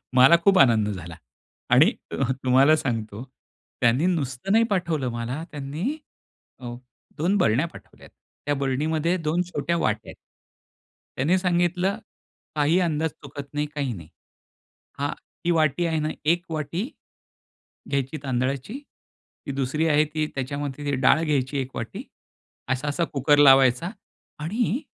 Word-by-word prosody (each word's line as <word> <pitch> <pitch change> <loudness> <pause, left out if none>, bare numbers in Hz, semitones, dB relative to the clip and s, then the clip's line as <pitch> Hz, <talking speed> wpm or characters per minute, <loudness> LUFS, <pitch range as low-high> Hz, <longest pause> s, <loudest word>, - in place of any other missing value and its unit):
मला 130 +5 +8
खूप 195 0 +5
आनंद 115 -5 +5
झाला 85 -4 -6 0.5
आणि - - +6 0.2
अ, - - -3
हं, 135 -1 +1
तुम्हाला 135 +4 +5
सांगतो 115 -6 -3 0.6
त्यांनी 120 +7 +3
नुसतं 150 -2 -1
नाही 225 +2 +5
पाठवलं 170 -9 0
मला. 120 +6 -4
त्यांनी 150 - -3 0.6
अ, 120 -2 -6 0.4
2 180 +7 +1
बरण्या 135 - +2
पाठवल्यात. - - -15 0.4
त्या 145 - +1
बरणीमध्ये 155 +5 0
2 165 +1 0
छोट्या 170 +3 -1
वाट्या 110 -8 -1
आहेत. - - -10 1.0
त्यांनी 155 +8 +2
सांगितलं, 180 +2 +1 0.6
"काही 155 +4 +3
अंदाज 160 -3 0
चुकत 140 0 -10
नाही, 150 0 0
काही 140 -4 -2
नाही. 85 -6 -10 0.9
हां, 145 +1 0 0.3
ती 175 - +3
वाटी 160 0 +2
आहे 160 -2 0
ना, 155 0 -1 0.2
1 170 +3 +2
वाटी 155 +4 -2 1.1
घ्यायची 140 +2 -1
तांदळाची. 135 - -2 0.7
ती 140 - -3
दुसरी 140 +4 0
आहे, 150 0 +4
ती 155 +1 -2
त्याच्यामध्ये 140 +1 -3
डाळ 155 - +5
घ्यायची 140 -3 0
1 130 0 -7
वाटी. - - -5 0.7
असा-असा 145 +5 -2
कुकर 145 +1 +3
लावायचा" 135 +1 +6 0.5
आणि 220 - -1
145 Hz, 130 wpm, -24 LUFS, 130-165 Hz, 1.1 s, मला